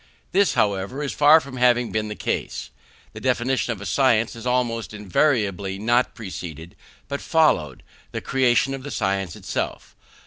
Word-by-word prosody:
This, 195 +1 +3
however, 100 +7 0
is 140 - -3
far 150 +2 +7
from 140 -4 -9
having 125 -1 +3
been 110 0 -1
the 105 - -5
case. - - -3 0.4
The - - -8
definition 125 0 0
of 110 - -5
a 100 - -8
science 115 -4 +2
has 115 +1 -7
almost 120 -3 -1
invariably 100 - 0
not 120 +4 +1
preceded, 90 -5 -8 0.3
but 140 0 -4
followed, 150 - +2 0.3
the - - -3
creation 130 +1 +2
of 135 - -5
the 145 - -7
science 95 - -1
itself. - - -4
120 Hz, 160 wpm, -23 LUFS, 100-135 Hz, 0.4 s, far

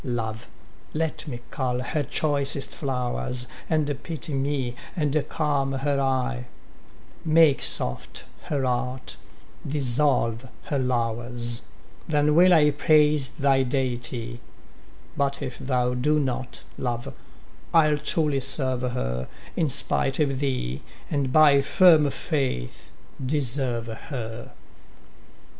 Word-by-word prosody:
Love, 110 -3 -3 0.5
let 160 0 -2
me 120 -5 -5
cull 125 -2 -1
her 150 +5 -1
choicest 140 -1 -1
flowers, 125 -3 -2 0.2
And 145 -3 0
pity 160 -3 -4
me, 135 -3 -1 0.2
and 150 -4 0 0.2
calm 140 -3 0
her 140 +1 0
eye; 130 -2 -1 0.8
Make 160 -3 +5
soft 60 - 0 0.2
her 140 -3 -1
heart, 125 +1 -2 0.5
dissolve 130 -3 +1
her 140 - -1
lowers, 120 -1 -1 0.5
Then 150 -1 +2
will 180 +3 +6
I 150 -4 +6
praise 150 -1 +3
thy 135 -2 +2
deity, 120 -2 -2 0.7
But 140 0 0
if 125 - -6
thou 125 -2 0
do 150 +5 +2
not, 130 -2 -3 0.2
Love, 120 -2 -3 0.6
I'll 155 -3 +4
truly 150 -2 +1
serve 130 -1 0
her 65 - -2 0.3
In 160 -3 +1
spite 135 +1 0
of 135 -3 +1
thee, 125 - -2 0.3
and 140 -3 0
by 145 -1 +6
firm 160 -2 +5
faith 135 - -3 0.4
deserve 130 -4 0
her. 115 0 -6
135 Hz, 110 wpm, -25 LUFS, 125-150 Hz, 0.8 s, will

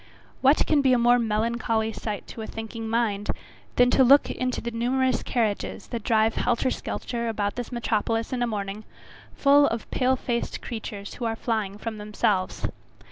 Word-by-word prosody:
What 275 +3 +5
can 300 -2 +3
be 265 -2 +4
a - - +5
more 240 +1 +5
melancholy 225 0 0
sight 210 -1 -5
to 225 - -7
a 220 - -5
thinking 225 0 -6
mind, 220 -3 0 0.5
than 245 0 +5
to 265 - +5
look 275 +3 +6
into 255 0 -2
the 235 - -4
numerous 255 +3 +1
carriages 220 -5 -1
that 235 -2 -3
drive 220 -1 +3
helter 250 +2 +1
skelter 235 -1 -3
about 205 -2 -1
this 245 0 -6
metropolis 230 0 -1
in 250 - -1
a 240 - +2
morning, 205 -1 -4 0.5
full 285 0 +5
of 230 -1 -4
pale 260 0 +2
faced 240 -2 -2
creatures 210 -3 -6
who 245 - -5
are 225 -1 0
flying 215 -4 -2
from 220 0 -5
themselves. 210 -2 -1
230 Hz, 175 wpm, -26 LUFS, 215-245 Hz, 0.5 s, look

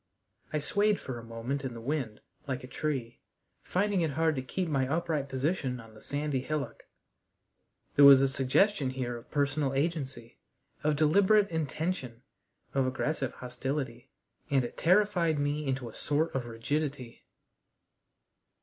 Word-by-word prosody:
I 155 - 0
swayed 205 +7 +2
for 125 -3 -6
a - - -10
moment 115 +5 -4
in 130 -3 -4
the - - -6
wind 120 -3 -3 0.3
like 130 -2 -3
a - - -7
tree, 135 -4 -3 0.4
finding 200 0 +1
it 160 -4 0
hard 160 -1 +3
to 130 - -1
keep 175 +8 -2
my 135 -4 +1
upright 155 -2 -1
position 135 -1 -1
on 115 -1 -13
the 110 - -15
sandy 145 -2 -2
hillock. 150 +2 -4 1.1
There 140 - +8
was 140 -1 +10
a 135 - +4
suggestion 135 +5 +2
here 130 -2 -3
of 115 - -11
personal 145 -1 0
agency, 135 -6 -2 0.4
of 150 0 +2
deliberate 200 +7 +4
intention, 155 -6 -3 0.5
of 135 -1 +2
aggressive 130 0 -1
hostility, 125 -1 -4 0.4
and 135 -3 +3
it - - -7
terrified 180 -3 +3
me 145 +1 -1
into 130 -2 -1
a 115 - -9
sort 155 +3 0
of 125 -3 -2
rigidity. 130 +1 -3
140 Hz, 150 wpm, -30 LUFS, 130-155 Hz, 1.1 s, was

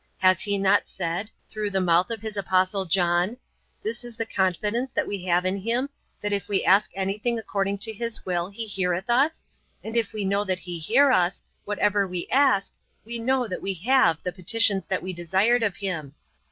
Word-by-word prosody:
Has 185 -1 +4
He 205 -1 0
not 195 +1 +3
said, 180 +3 -3 0.2
through 215 -1 -3
the 195 -1 0
mouth 180 +1 +3
of 225 -2 -5
His 220 -1 -4
Apostle 190 0 +1
John, 175 +4 +2 0.5
'This 230 +3 -2
is 240 -2 -10
the 230 - -2
confidence 210 +6 -1
that - - 0
we 195 -3 -5
have 180 0 +2
in 185 +1 0
Him, 235 +7 -1 0.3
that 205 0 -1
if 200 - -2
we 200 - +1
ask 200 +3 +5
anything 205 +5 -1
according 200 -2 -2
to 220 +3 -1
His 230 +1 -4
will, 175 -1 -1
He 225 +3 -5
heareth 190 +1 -1
us, 280 +7 +2 0.4
and 220 +1 -6
if 230 -3 +1
we 210 -2 -3
know 200 +1 +1
that 190 -2 -1
He 175 -2 -6
hear 260 - +4
us, 180 -4 +2 0.2
whatsoever 205 -1 +1
we 180 -1 -4
ask, 265 -8 +3 0.3
we 235 +1 -4
know 255 +1 +1
that 185 - -5
we 195 0 -2
have 185 - +3
the 180 - -2
petitions 195 +1 +1
that - - -1
we 185 0 -4
desired 190 +8 +2
of 205 -5 0
Him.' 160 -8 -4
200 Hz, 200 wpm, -25 LUFS, 185-225 Hz, 0.5 s, ask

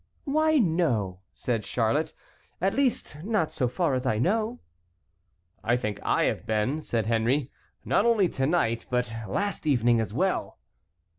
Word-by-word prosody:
"Why, 310 +2 +2
no," 155 - +1
said 115 -4 -2
Charlotte, 140 +10 0 0.5
"at 195 +2 +1
least, 245 - -1
not 200 -7 0
so 150 -6 0
far 145 +4 0
as 130 0 -1
I 110 - +1
know." 220 - 0 1.0
"I 120 +2 +2
think 105 -5 -3
I - - +2
have - - -1
been," 110 +8 0
said 115 -7 -1
Henry, 120 +5 +1 0.3
"not - - +3
only 220 -5 +4
to 135 -2 -1
night 115 -9 0
but 125 -2 0
last 200 -5 -2
evening 120 -4 +3
as 105 -3 -3
well." 185 - -1
135 Hz, 150 wpm, -27 LUFS, 115-190 Hz, 1.0 s, only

